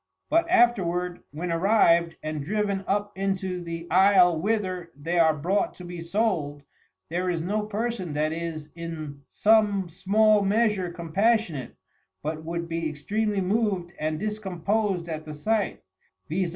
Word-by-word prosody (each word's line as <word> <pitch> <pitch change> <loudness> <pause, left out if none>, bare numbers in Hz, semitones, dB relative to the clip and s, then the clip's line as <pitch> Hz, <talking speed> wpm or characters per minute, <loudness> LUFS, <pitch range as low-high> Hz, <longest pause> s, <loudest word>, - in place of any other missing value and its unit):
But 335 +1 +3
afterward, 180 - +2
when 170 +4 -4
arriv'd, 170 -2 +3
and 155 -2 -3
driven 200 +2 -1
up 205 +1 -1
into 190 -2 -2
the 170 -1 -6
Isle 185 -3 +5
whither 185 -4 -1
they 165 +5 -1
are 160 -2 +5
brought 185 +8 0
to 180 - -10
be 175 -1 -7
sold, 165 -6 -1 0.5
there 180 +2 -1
is 165 -2 -1
no 210 +4 -1
Person 215 -5 -3
that 155 +1 0
is 160 -2 -5
in 155 -4 -7
some 205 -4 +3
small 210 +4 +3
measure 205 -2 +1
compassionate, 175 - 0 0.5
but 155 +1 -3
would 170 +1 -4
be 165 -1 -2
extreamly 205 +7 -1
mov'd 190 -3 0
and 155 0 -1
discompos'd 200 -2 -1
at 155 -2 -4
the 155 -1 -8
sight; 215 +7 -1 0.4
_viz. 175 +2 -1
180 Hz, 140 wpm, -26 LUFS, 165-205 Hz, 0.5 s, Isle